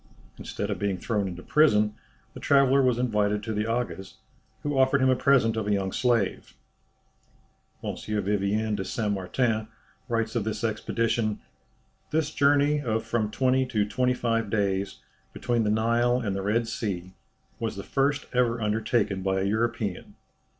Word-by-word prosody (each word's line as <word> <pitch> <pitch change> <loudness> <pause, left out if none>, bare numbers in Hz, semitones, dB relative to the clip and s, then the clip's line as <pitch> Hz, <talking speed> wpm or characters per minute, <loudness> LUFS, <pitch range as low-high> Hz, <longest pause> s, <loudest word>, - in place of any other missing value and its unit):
Instead 105 +1 -4
of 100 - -3
being 100 -2 -1
thrown 105 +1 -1
into 90 0 -7
prison 105 -9 +3 0.4
the - - -9
traveller 140 -1 +4
was 125 -3 +2
invited 105 -4 0
to 110 - -3
the 105 +1 -1
Aga's, 115 -5 -3 0.5
who 145 -1 -1
offered 135 +1 +4
him 130 0 +4
a - - +3
present 125 -4 +3
of 110 -2 -2
a - - +1
young 95 -1 -1
slave. 120 -5 0 1.3
M. - - -3
Vivien 105 +1 -1
de 95 - -3
Saint 105 +2 -2
Martin 110 +3 -1 0.4
writes 115 0 -1
of 115 - +1
this 110 0 -4
expedition, 110 0 -1 0.7
"This 155 -1 0
journey 145 +1 +3
of 115 -4 -1
from 110 -3 0
twenty 130 +3 +2
to 110 -5 +1
twenty 125 +3 +1
five 115 -3 -1
days, 100 -2 -1 0.3
between 120 -2 0
the - - +1
Nile 115 +3 +2
and 100 -5 -2
the 100 - -2
Red 110 +4 0
Sea, 100 -6 -4 0.5
was 115 -2 -3
the 100 - -6
first 145 +1 0
ever 120 -1 +2
undertaken 105 -2 0
by 95 0 0
a - - 0
European. 110 -2 -2
110 Hz, 160 wpm, -26 LUFS, 105-125 Hz, 1.3 s, traveller